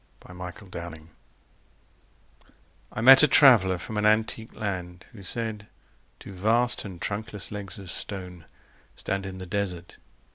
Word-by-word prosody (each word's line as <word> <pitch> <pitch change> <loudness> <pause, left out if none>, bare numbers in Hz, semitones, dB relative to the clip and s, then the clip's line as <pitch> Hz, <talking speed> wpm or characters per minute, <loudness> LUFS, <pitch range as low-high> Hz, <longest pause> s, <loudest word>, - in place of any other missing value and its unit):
Y 90 - -12
Z 90 +3 -8
Ozymandias 85 -3 -9 1.8
I 110 - -4
MET 135 +3 +9
a 150 - +6
traveller 110 -12 +6
from 105 +5 -6
an 105 - 0
antique 110 +1 0
land 90 -3 -5
Who 110 -5 -13
said: 105 +1 -4 0.5
Two 100 - -10
vast 115 +6 +1
and 95 -4 -9
trunkless 105 0 -4
legs 100 0 -7
of 95 -3 -7
stone 90 -4 -6 0.5
Stand 100 0 -3
in 95 0 -7
the 95 - -7
desert 90 -2 -4
100 Hz, 140 wpm, -26 LUFS, 90-110 Hz, 1.8 s, MET